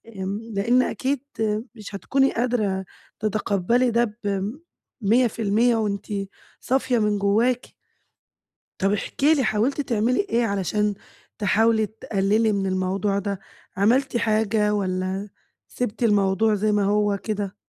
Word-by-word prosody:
آمم، 195 +2 -3
لإن 235 +6 +3
أكيد 265 +1 -1 0.2
آآ 215 0 0
مش 210 -2 -9
هتكوني 270 +7 +1
قادرة 215 -6 0 0.3
تتقبلي 215 +3 +1
ده 230 -2 0 0.9
ب100% 230 +1 +2
وأنتِ 205 -3 -2 0.5
صافية 255 -2 +1
من 210 -1 +1
جواكِ. 230 +5 +1 1.1
طَب 195 +1 +2
احكي 280 +8 +1
لي 275 -4 +1
حاولتِ 235 +7 +1
تعملي 235 -1 0
إيه، 235 +1 +2
علشان 205 +1 0 0.4
تحاولي 220 +2 +3
تقللي 215 +1 0
من 195 -2 -1
الموضوع 190 +2 0
ده؟ 200 -1 -3 0.4
عملتِ 250 +6 +2
حاجة 215 -2 +1
والّا 190 0 -2 0.4
سبتِ 245 -1 -3
الموضوع 205 0 +3
زي 210 +1 +1
ما 205 -1 +2
هو 205 0 +2
كده؟ 205 -2 -3
210 Hz, 120 wpm, -23 LUFS, 200-235 Hz, 1.1 s, لإن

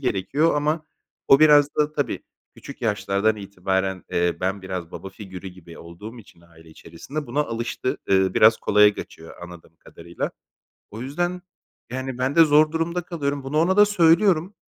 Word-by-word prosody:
gerekiyor 135 - 0
ama 150 +2 -1 0.4
o 135 +2 +6
biraz 145 -1 +5
da 150 0 +1
tabii - - -2 0.4
küçük - - -12
yaşlardan 105 0 0
itibaren, 95 -1 -3
eee, 85 0 0
ben 95 +1 -2
biraz 90 -2 -6
baba 95 - -8
figürü 95 -1 -10
gibi 90 -2 -14
olduğum 105 +8 -11
için 100 -5 -17
aile 80 -1 -20
içerisinde 135 - -8
buna 135 +5 -1
alıştı. 115 -1 -3
Iıı, 95 -1 +2
biraz 110 +1 +6
kolaya 105 0 +4
kaçıyor 80 +1 -11
anladığım 85 -2 -13
kadarıyla. 85 +2 -7 0.6
O 110 - -9
yüzden 175 +8 -3 0.5
yani 130 0 -5
ben 130 +4 -1
de 165 - +8
zor 155 0 +4
durumda 170 +2 -2
kalıyorum. 145 -5 -4
Bunu 135 +3 -2
ona 180 +4 +2
da 210 - +8
söylüyorum. 180 -1 +3
115 Hz, 160 wpm, -23 LUFS, 95-155 Hz, 0.6 s, de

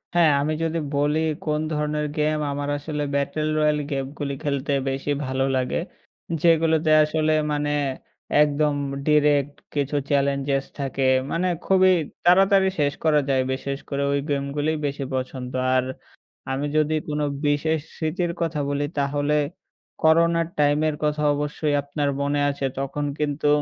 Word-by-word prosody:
হ্যাঁ, 170 -3 +5
আমি 155 +2 0
যদি 165 0 -1 0.2
বলি 145 +2 +1 0.3
কোন 150 -1 0
ধরনের 150 0 -1
গেম 155 0 +1
আমার 145 0 -3
আসলে 150 +1 -4
'ব্যাটল 140 +2 -1
রয়াল' 150 -1 +2
গেমগুলি 140 +1 -3
খেলতে 140 -1 -1 0.2
বেশি 135 +2 -2
ভালো 130 0 -1
লাগে। 130 -1 0 0.6
যেগুলোতে 160 -1 +3
আসলে 155 0 0 0.2
মানে, 145 0 0 0.7
একদম 150 0 +2 0.3
ডিরেক্ট 145 -1 +3 0.2
কিছু 145 0 -1
চ্যালেঞ্জেস 140 -1 +1
থাকে। 135 -1 -2 0.3
মানে 180 +2 0 0.2
খুবই 190 -1 +5 0.3
তাড়াতাড়ি 190 +2 +5
শেষ 145 -1 +2
করা 155 -2 +4
যায়। 135 -1 +3
বিশেষ 135 +1 -4
করে 140 0 -1
ওই 140 - +1
গেমগুলোই 145 +2 -1
বেশি 140 0 -2
পছন্দ। 130 -1 -4 0.2
আর, 130 0 +2 0.7
আমি 135 +2 -1
যদি 155 0 +2
কোনো 150 -1 -1 0.2
বিশেষ 155 +2 +1 0.2
স্মৃতির 170 +2 -1
কথা 165 -3 -1
বলি, 145 0 -1
তাহলে 145 +1 0 0.7
করোনার 165 +1 +4
টাইমের 150 +1 +2
কথা 150 0 0
অবশ্যই 150 +1 -1
আপনার 145 0 -2
মনে 145 +1 0
আছে 140 -1 -3
তখন 140 +2 -2
কিন্তু 145 0 -1
145 Hz, 135 wpm, -23 LUFS, 140-155 Hz, 0.7 s, হ্যাঁ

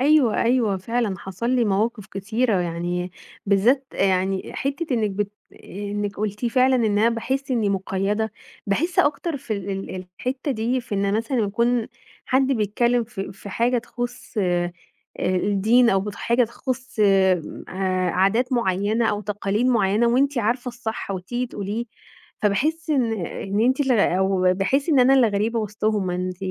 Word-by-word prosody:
أيوه، 275 -5 +4
أيوه، 235 -4 +2
فعلًا 225 +2 -1
حصل 195 +7 -4
لي 250 -2 +3
مَواقِف 210 +1 0
كتيرة، 210 +1 0
يعني 175 +1 -2 0.4
بالذات 235 +8 +3
يعني 190 0 0
حتّة 275 +5 -2
إنِك 215 -3 +1
بت 205 +1 -3 0.2
آآ، - - -18 0.4
إنِك 205 -1 -3
قُلتِ 210 +2 -2
فعلًا 255 +2 +3
إن 235 - +1
أنا 220 +2 +4
باحس 260 +4 -2
إني 230 -5 +1
مُقيّدة. 195 +3 -1 0.3
باحس 325 - 0
أكتر 295 +2 +2
في 245 -4 -5
ال 200 -1 -3
ال 190 -1 -5
الحتّة 265 +3 -3
دي 245 +1 0
في 235 -4 -6
إن 200 0 +1
مثلًا 230 +4 -1
يكون 235 +2 +1 0.4
حد 265 +1 +3
بيتكلم 235 +2 +1
ف 220 -3 -8
في 195 +1 -7
حاجة 240 +5 +1
تخُص 245 +1 -6 0.9
الدين 205 +6 +3
أو 195 - +3
بت 205 +1 -5
حاجة 235 +3 +2
تخُص 255 +1 -5 1.1
عادات 220 +8 +2
مُعينة 215 0 +1
أو 205 - -2
تقاليد 210 +2 -1
مُعينة، 220 -2 +3
وأنتِ 270 +3 +2
عارفة 240 +3 0
الصح 235 -4 -5
وتيجي 195 +7 -3
تقوليه. 210 +1 -4 0.6
فباحس 305 +11 0
إن 250 -6 +2
إن 200 +5 -3
أنتِ 255 +5 +2
ال 270 -2 +2
أو 190 -3 +3
باحس 260 - 0
إن 290 -5 +5
أنا 260 +2 +6
الغريبة 225 -2 +2
وسطهُم. 210 -2 -1
أنتِ 180 0 -3
220 Hz, 150 wpm, -23 LUFS, 195-250 Hz, 1.1 s, أنا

